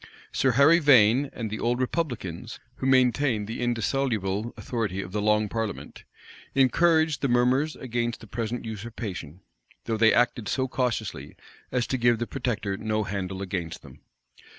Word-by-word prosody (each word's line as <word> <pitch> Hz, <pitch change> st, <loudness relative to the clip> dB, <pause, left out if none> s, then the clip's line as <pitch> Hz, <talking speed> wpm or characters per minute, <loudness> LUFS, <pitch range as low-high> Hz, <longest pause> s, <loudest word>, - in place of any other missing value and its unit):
Sir 130 Hz, -2 st, +2 dB
Harry 140 Hz, +7 st, +6 dB
Vane 130 Hz, -2 st, +5 dB
and 110 Hz, -3 st, -5 dB
the 110 Hz, -, -4 dB
old 120 Hz, +1 st, 0 dB
republicans, 125 Hz, -, -3 dB, 0.2 s
who 130 Hz, -, -2 dB
maintained 130 Hz, -3 st, +3 dB
the 115 Hz, +3 st, -5 dB
indissoluble 115 Hz, -3 st, -1 dB
authority 110 Hz, -6 st, -3 dB
of 90 Hz, -2 st, -5 dB
the 105 Hz, +1 st, -2 dB
long 105 Hz, 0 st, +2 dB
parliament, 110 Hz, 0 st, -5 dB, 0.5 s
encouraged 160 Hz, +2 st, +3 dB
the 140 Hz, -, +1 dB
murmurs 125 Hz, +5 st, +2 dB
against 120 Hz, -2 st, -3 dB
the -, -, -12 dB
present 115 Hz, +2 st, -4 dB
usurpation; 105 Hz, -7 st, -6 dB, 0.4 s
though 115 Hz, -, -1 dB
they 110 Hz, 0 st, +5 dB
acted 120 Hz, -2 st, +1 dB
so 130 Hz, -1 st, 0 dB
cautiously 125 Hz, -2 st, -3 dB, 0.4 s
as 125 Hz, -2 st, 0 dB
to 130 Hz, -, -2 dB
give 120 Hz, -1 st, +3 dB
the 120 Hz, -, -2 dB
protector 115 Hz, -7 st, -3 dB
no 110 Hz, 0 st, -1 dB
handle 95 Hz, -1 st, -4 dB
against 90 Hz, -4 st, -5 dB
them. -, -, -14 dB
120 Hz, 150 wpm, -26 LUFS, 105-130 Hz, 0.5 s, Harry